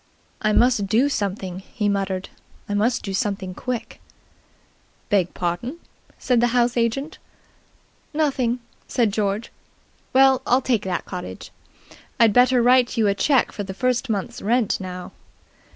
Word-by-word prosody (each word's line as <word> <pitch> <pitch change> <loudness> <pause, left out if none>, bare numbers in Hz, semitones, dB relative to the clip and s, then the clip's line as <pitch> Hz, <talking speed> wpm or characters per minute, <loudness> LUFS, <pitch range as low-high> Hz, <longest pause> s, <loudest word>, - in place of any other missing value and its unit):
"I 215 - +2
must 235 -3 +3
do 235 +8 +3
something," 195 -6 -3
he 210 +2 -3
muttered. 195 -2 -1 0.4
"I 205 - -3
must 225 +5 +1
do 195 - -4
something 195 -1 -2
quick." 245 +3 -5 1.1
"Beg 190 -4 +2
pardon," 185 - -3 0.4
said 245 -2 +1
the 240 - +4
house 240 0 +2
agent. 245 +6 -1 0.9
"Nothing," 265 -6 0 0.3
said 225 -5 +1
George. 205 +1 -1 0.6
"Well, 265 0 +5
I'll 250 - +4
take 245 -6 0
that 185 - -2
cottage. 180 - -7 0.7
I'd 225 -3 +5
better 250 0 +5
write 250 0 +4
you 225 - +3
a 200 - +3
cheque 260 +6 +2
for - - -6
the 190 -1 -6
first 250 +2 0
month's 200 -3 -3
rent 230 +1 +1
now." 185 -1 -7
225 Hz, 140 wpm, -22 LUFS, 195-250 Hz, 1.1 s, Well